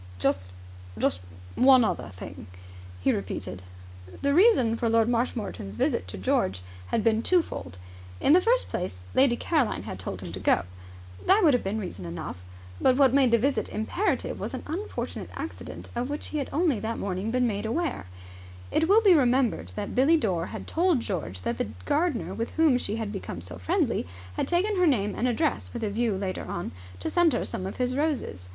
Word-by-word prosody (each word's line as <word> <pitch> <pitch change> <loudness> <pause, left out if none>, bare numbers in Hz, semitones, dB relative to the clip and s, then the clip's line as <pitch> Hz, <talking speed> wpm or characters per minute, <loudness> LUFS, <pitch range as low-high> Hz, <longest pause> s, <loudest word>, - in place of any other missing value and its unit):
"Just 90 0 0 0.5
just 90 - 0 0.3
one 255 -1 +6
other 220 - -1
thing," 90 -1 -9 0.5
he - - +3
repeated. 95 -1 -4 0.6
The 280 0 +3
reason 305 - +5
for 230 0 0
Lord 225 0 +4
Marshmoreton's 230 - -2
visit 90 - 0
to 95 - -6
George 95 0 0 0.2
had 215 - 0
been 225 0 +3
twofold. 230 - 0 0.4
In 285 - +4
the 360 - +6
first - - +2
place, 135 - -4
Lady 260 -2 +4
Caroline 285 -4 0
had 95 - -7
told 95 +1 -5
him 90 -2 -7
to 95 - -6
go. 95 - +3 0.6
That 400 +2 +5
would 305 -5 +6
have 245 - +2
been 195 +3 -2
reason 175 - -6
enough. 85 +1 -6 0.4
But 255 - +5
what 270 -3 +5
made 270 -2 +5
the 235 - +5
visit 275 +5 0
imperative 280 - -1
was - - -4
an - - -6
unfortunate 355 +8 -4
accident - - -7
of 245 +2 -2
which 290 +1 -4
he 305 - -2
had 275 - -3
only 305 - +2
that 225 +2 -3
morning 195 +2 -2
been 250 +1 +2
made 210 -2 -1
aware. 275 - -2 0.6
It 320 +2 +2
will 435 +3 +6
be 395 -4 +7
remembered 260 -4 +2
that 205 -1 -4
Billie 280 +6 +5
Dore 185 - 0
had - - -7
told 340 -5 +2
George 150 - -4
that 115 +3 -2
the - - 0 0.2
gardener 310 -4 0
with 230 +1 -3
whom 315 -6 +4
she 210 - -2
had 220 -2 -3
become 195 - -5
so 90 0 -8
friendly 90 -1 0 0.3
had - - -2
taken 380 +4 +1
her 360 -1 +4
name 210 -8 +2
and 250 - 0
address 285 +5 0
with 235 -2 -4
a 210 - -1
view 220 -2 0
later 190 -1 -3
on 175 - -4 0.3
to - - -2
send 345 -3 +4
her - - 0
some 185 - -4
of 195 - -7
his 250 0 0
roses. 275 - -2
230 Hz, 195 wpm, -27 LUFS, 180-290 Hz, 0.6 s, be